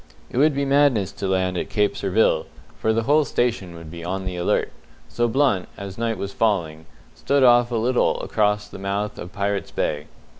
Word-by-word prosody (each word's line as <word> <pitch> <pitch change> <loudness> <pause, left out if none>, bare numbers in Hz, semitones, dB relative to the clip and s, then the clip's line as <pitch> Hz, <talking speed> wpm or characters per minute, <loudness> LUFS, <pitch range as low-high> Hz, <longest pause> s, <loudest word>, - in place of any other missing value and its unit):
It 125 - -1
would 150 0 +4
be 140 0 0
madness 135 -8 +3
to 100 - -4
land 95 -1 0
at - - -4
Cape 105 -1 +1
Surville, 100 +3 +1 0.3
for 110 - +1
the 115 +1 +1
whole 150 +6 +4
station 120 -9 -1
would 85 -1 -10
be 85 0 -8
on 95 +2 -3
the 90 -1 -4
alert; 90 0 0 0.4
so 120 0 0
Blunt, 120 -6 +1
as 100 -1 -7
night 115 -1 -2
was 100 +1 -5
falling, 80 -8 -1 0.3
stood 140 -1 +1
off 120 -1 +5
a 120 - -3
little 120 +3 +1
across 105 -1 0
the - - -10
mouth 100 +2 -3
of 90 - -7
Pirates' 100 0 -2
Bay. 75 0 -2
105 Hz, 195 wpm, -23 LUFS, 95-120 Hz, 0.4 s, off